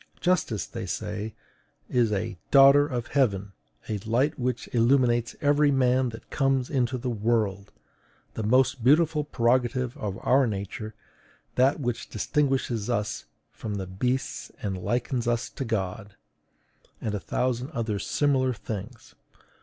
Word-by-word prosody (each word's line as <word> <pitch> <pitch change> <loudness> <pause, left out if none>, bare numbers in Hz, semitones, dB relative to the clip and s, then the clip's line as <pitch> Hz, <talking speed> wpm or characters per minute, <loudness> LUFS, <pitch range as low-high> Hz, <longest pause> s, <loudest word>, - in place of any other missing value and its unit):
Justice, 175 - +1
they - - -6
say, 110 +1 -4 0.5
is 120 -3 +2
a 105 +1 -2
DAUGHTER 140 +1 +7
OF 120 -4 -3
HEAVEN; 105 -8 +1 0.4
A 105 -2 -2
LIGHT 125 +9 0
WHICH 125 -1 -2
ILLUMINES 120 -1 +3
EVERY 145 0 +4
MAN 130 -1 +3
THAT 115 0 -11
COMES 135 -2 +1
INTO 130 -2 +1
THE 125 0 -3
WORLD; 105 -3 0 0.6
THE - - -4
MOST 125 +3 +2
BEAUTIFUL 150 +3 +4
PREROGATIVE 125 -1 +1
OF 100 -2 -4
OUR 130 0 +4
NATURE; 105 +1 -5 0.6
THAT 135 +4 +3
WHICH 120 -3 -3
DISTINGUISHES 130 -3 0
US 105 -3 -2 0.3
FROM 105 -2 -5
THE 95 -1 -3
BEASTS 125 +8 -2
AND 95 -3 -2
LIKENS 120 +1 -1
US 120 0 0
TO 135 - -5
GOD 100 -2 -3 0.8
and 110 - -3
a 105 - -1
thousand 125 +4 -1
other 115 -8 -2
similar 130 -1 +1
things. 110 +1 -7
120 Hz, 135 wpm, -26 LUFS, 110-130 Hz, 0.8 s, DAUGHTER